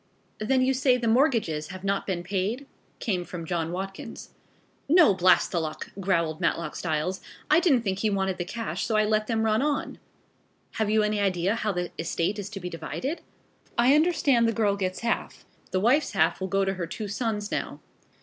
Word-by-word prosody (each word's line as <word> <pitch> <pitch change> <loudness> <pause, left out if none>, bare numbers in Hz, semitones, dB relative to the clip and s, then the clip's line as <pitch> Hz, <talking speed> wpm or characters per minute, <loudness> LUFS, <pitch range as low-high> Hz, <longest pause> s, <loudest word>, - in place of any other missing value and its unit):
"Then 255 +4 +2
you 265 +1 +3
say 255 -1 +3
the 235 -2 -2
mortgages 225 - +2
have 185 +2 -9
not 195 0 -1
been 180 -3 -2
paid?" 200 +8 -2 0.3
came 185 -5 -1
from 175 -1 -7
John 165 -1 -2
Watkins. 195 +2 -6 0.6
"No, 325 - +7
blast 185 0 +4
the 175 - +1
luck!" 155 -1 -5
growled 170 -4 0
Matlock 165 -2 -1
Styles. 165 +3 -2 0.3
"I 310 - +7
didn't 290 -10 +3
think 195 -3 -1
he 215 - +1
wanted 190 -2 -1
the - - 0
cash 225 +5 -4
so 225 - 0
I 215 0 +4
let 215 0 +1
them 225 -2 0
run 220 +1 +2
on." 290 0 -1 0.7
"Have 220 -2 -1
you 215 0 +3
any 210 0 0
idea 190 -1 +1
how 215 -2 -1
the 180 -2 -3
estate 170 +5 -1
is 200 0 -5
to 205 -2 -7
be 180 - -5
divided?" 215 - -4 0.6
"I 245 +3 +5
understand 295 -7 +3
the 230 - +1
girl 205 -3 +2
gets 185 -2 -3
half. 235 0 -2 0.2
The 185 - 0
wife's 250 +9 +2
half 195 - +2
will 190 - -1
go 195 +1 +1
to 195 - 0
her 180 -3 -4
two 215 +4 -5
sons 210 -1 -2
now." - - -3
205 Hz, 200 wpm, -26 LUFS, 185-230 Hz, 0.7 s, No